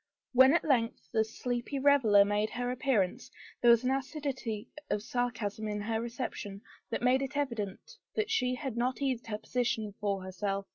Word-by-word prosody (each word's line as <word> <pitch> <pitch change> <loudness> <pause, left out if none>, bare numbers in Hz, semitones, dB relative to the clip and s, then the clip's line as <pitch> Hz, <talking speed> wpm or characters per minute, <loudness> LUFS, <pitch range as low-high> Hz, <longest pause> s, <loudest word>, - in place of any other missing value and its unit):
When 260 +4 +7
at 340 - +2
length 240 -6 0
the 220 -1 +4
sleepy 240 +4 -3
reveler 260 -8 +5
made 205 +1 +1
her 245 0 -2
appearance, 250 -2 0 0.3
there 240 - +6
was 235 0 +6
an 255 - +2
acidity 265 -5 -3 0.2
of 205 - -1
sarcasm 225 -3 -2
in 210 0 -2
her 220 +1 -1
reception 230 -4 -5 0.3
that 230 - -3
made 255 +2 +4
it 275 +1 -3
evident 230 -9 -3 0.3
she 255 - +1
had 265 -3 -4
not 245 +2 0
eased 260 -5 -1
her 210 -2 -2
position 220 -2 -1
for 200 -2 -1
her 190 - -6
self. 195 +1 -2
235 Hz, 175 wpm, -31 LUFS, 210-260 Hz, 0.3 s, When